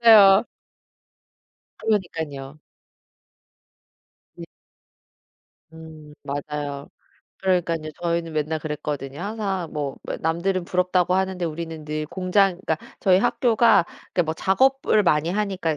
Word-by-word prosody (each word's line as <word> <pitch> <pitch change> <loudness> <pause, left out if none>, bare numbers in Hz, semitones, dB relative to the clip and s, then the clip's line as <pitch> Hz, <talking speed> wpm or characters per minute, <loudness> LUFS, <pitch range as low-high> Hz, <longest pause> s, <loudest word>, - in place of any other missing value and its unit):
맞아요. 210 -2 +8 1.3
그러니깐요. 160 -9 -2 1.8
네. - - -8 1.3
음 155 -2 -12
맞아요. 145 0 -5 0.5
그러니깐요. 170 -4 0
저희는 170 -1 -1
맨날 155 +1 -1
그랬거든요. 145 -2 -5
항상 195 -5 -3
뭐 145 -3 -3
뭐야 - - -5
남들은 170 +3 0
부럽다고 180 0 +1
하는데 190 -1 -1
우리는 160 -1 -5
늘 155 0 -3
공장 185 +1 +1
그러니까 160 - +1 0.2
저희 185 -1 +4
학교가 225 -3 +4 0.3
그러니까 175 - +2
뭐 160 +1 -2
작업을 250 +3 +2
많이 155 -1 +2
하니까 190 -5 -1
170 Hz, 270 characters per minute, -23 LUFS, 155-195 Hz, 1.8 s, 맞아요